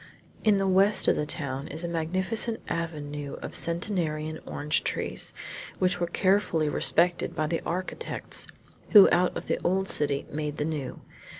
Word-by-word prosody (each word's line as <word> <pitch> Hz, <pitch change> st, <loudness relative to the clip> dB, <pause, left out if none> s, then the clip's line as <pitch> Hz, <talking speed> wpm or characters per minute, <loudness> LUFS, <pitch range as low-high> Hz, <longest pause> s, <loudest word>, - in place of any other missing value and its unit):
In 210 Hz, -2 st, +4 dB
the 195 Hz, 0 st, +1 dB
west 195 Hz, +2 st, +5 dB
of -, -, +5 dB
the 150 Hz, -, -2 dB
town 140 Hz, -3 st, -2 dB
is 160 Hz, +3 st, -6 dB
a -, -, -1 dB
magnificent 185 Hz, +7 st, -1 dB
avenue 150 Hz, -4 st, -4 dB
of -, -, -6 dB
centenarian 165 Hz, -3 st, -2 dB
orange 150 Hz, +1 st, 0 dB
trees -, -, -3 dB, 0.5 s
which 180 Hz, -1 st, +1 dB
were 175 Hz, -, 0 dB
carefully 185 Hz, -4 st, +2 dB
respected 170 Hz, +3 st, +1 dB
by 155 Hz, -, 0 dB
the 165 Hz, +2 st, -1 dB
architects 185 Hz, -, -4 dB, 0.5 s
who 205 Hz, -3 st, +11 dB
out 180 Hz, +1 st, +2 dB
of -, -, -6 dB
the -, -, -1 dB
old 190 Hz, +2 st, +1 dB
city 145 Hz, -4 st, +1 dB
made 150 Hz, 0 st, -3 dB
the 150 Hz, -, -1 dB
new. 150 Hz, -4 st, -4 dB
170 Hz, 160 wpm, -27 LUFS, 150-185 Hz, 0.5 s, who